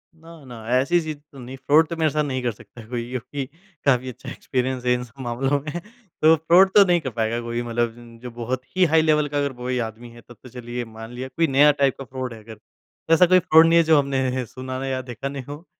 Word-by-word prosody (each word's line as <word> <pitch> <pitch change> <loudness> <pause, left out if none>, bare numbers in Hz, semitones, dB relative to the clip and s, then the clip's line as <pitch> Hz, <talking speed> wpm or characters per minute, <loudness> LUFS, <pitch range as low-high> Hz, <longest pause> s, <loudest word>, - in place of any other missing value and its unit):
ना, 165 -1 -15
ना, 115 -3 -10
ऐसी 170 +7 +2
चीज़ 155 -2 -5
तो 135 - -13
नहीं, 125 +2 -8
फ्रॉड 155 +4 +3
तो 170 - -5
मेरे 160 -1 +2
साथ 150 +2 0
नहीं 130 -3 -3
कर 120 - 0
सकता 110 +1 -14
कोई 120 -1 -4
क्योंकि 130 +2 -5 0.4
काफ़ी 130 -2 +2
अच्छा 125 +1 -10
एक्सपीरियंस 125 -1 -3
है 125 - +3
इन 125 0 -2
सब 125 +3 -17
मामलों 135 +4 0
में 155 +4 -5 0.4
तो 160 +1 +6
फ्रॉड 175 +5 +4
तो 205 - +9
नहीं 175 -1 +3
कर 135 - -4
पाएँगा 115 0 -2
कोई 120 0 -3
मतलब 120 -1 -1
ज 115 -1 -15
जो 125 - -7
बहुत 120 +2 -4
ही 185 -1 +4
हाई 160 0 +4
लेवल 150 -1 +2
का 145 - -3
अगर 140 -2 -1
कोई 125 +1 -3
आदमी 115 +2 -12
है, 120 0 -15
तब 120 +1 -16
तो 125 - -11
चलिए 120 0 -6
मान 115 +1 -11
लिया, 130 +2 -6
कोई 165 +5 0
नया 145 +2 +5
टाइप 140 -2 +1
का 135 - -7
फ्रॉड 130 -2 -6
है 115 - -11
अगर। 110 0 -12 0.5
ऐसा 180 +3 +6
कोई 185 +1 +5
फ्रॉड 160 -2 +6
नहीं 165 - +4
है 170 - +6
जो 160 -1 +5
हमने 130 -2 -1
सुना 130 +2 -7
नहीं 135 0 -3
या 130 0 -2
देखा 130 +2 -6
नहीं 140 -1 -6
हो 145 +6 -10
130 Hz, 255 wpm, -23 LUFS, 120-150 Hz, 0.5 s, तो